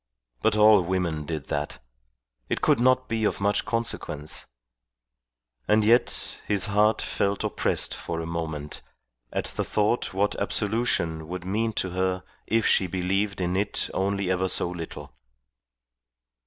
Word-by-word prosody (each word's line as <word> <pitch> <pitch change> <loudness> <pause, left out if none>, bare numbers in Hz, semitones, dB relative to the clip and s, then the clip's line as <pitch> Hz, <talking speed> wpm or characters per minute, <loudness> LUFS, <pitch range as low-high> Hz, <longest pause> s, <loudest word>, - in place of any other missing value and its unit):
But 110 -1 +3
all 105 -1 +7
women 85 -4 -1
did 80 -4 -3
that. 75 -3 -2 0.7
It - - -1
could - - +4
not 130 +1 +3
be 115 -1 -1
of 105 - +1
much 100 +1 +1
consequence. 115 -10 -3 1.2
And 105 0 +4
yet 120 +3 +2
his 100 -1 +1
heart 105 +1 +3
felt 100 0 -1
oppressed - - 0
for 85 - -4
a 80 - -3
moment 80 -3 -4 0.5
at - - -2
the - - -2
thought 105 +3 0
what 100 +2 +1
absolution 100 -8 0
would 90 +1 -5
mean 110 +4 0
to 95 -3 -1
her 95 0 -1 0.2
if 115 -1 +2
she 95 - +4
believed 95 +3 -1
in 90 0 0
it 100 +2 0
only 100 -1 0
ever 95 0 +1
so 90 - 0
little. 85 -2 -7
95 Hz, 140 wpm, -26 LUFS, 85-105 Hz, 1.2 s, all